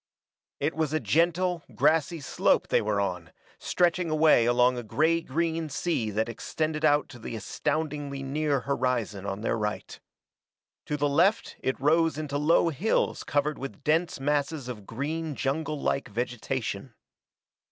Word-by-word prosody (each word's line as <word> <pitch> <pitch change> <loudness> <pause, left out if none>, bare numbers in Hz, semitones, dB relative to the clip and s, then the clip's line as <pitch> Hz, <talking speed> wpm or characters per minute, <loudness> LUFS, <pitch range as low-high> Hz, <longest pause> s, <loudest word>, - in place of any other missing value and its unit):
It 150 +3 0
was 155 -2 -1
a 155 - +2
gentle, 170 - +1
grassy 155 +3 +2
slope 135 - +1
they - - +3
were 105 -1 0
on, 90 -4 -3 0.3
stretching 175 -1 +1
away 155 -6 +5
along 125 +1 +4
a 120 - -3
gray 160 +9 +1
green 165 +1 -1
sea 140 -6 -1
that 110 +2 0
extended 155 +6 -3
out 145 -1 +4
to 120 -4 -11
the 115 - -6
astoundingly 145 +4 -3
near 145 0 0
horizon 125 -8 -1
on 100 +1 -4
their 115 - 0
right. 105 -1 -4 0.9
To 150 - -1
the 145 0 +1
left 175 +10 +2
it 130 - -2
rose 160 +2 +3
into 145 -2 -2
low 165 +3 +4
hills 170 +8 0
covered 145 +1 0
with 135 +1 -7
dense 160 +2 +1
masses 145 0 -1
of 105 -6 -7
green 150 +5 -3
junglelike 145 0 -1
vegetation. 120 0 -3
145 Hz, 145 wpm, -27 LUFS, 125-160 Hz, 0.9 s, away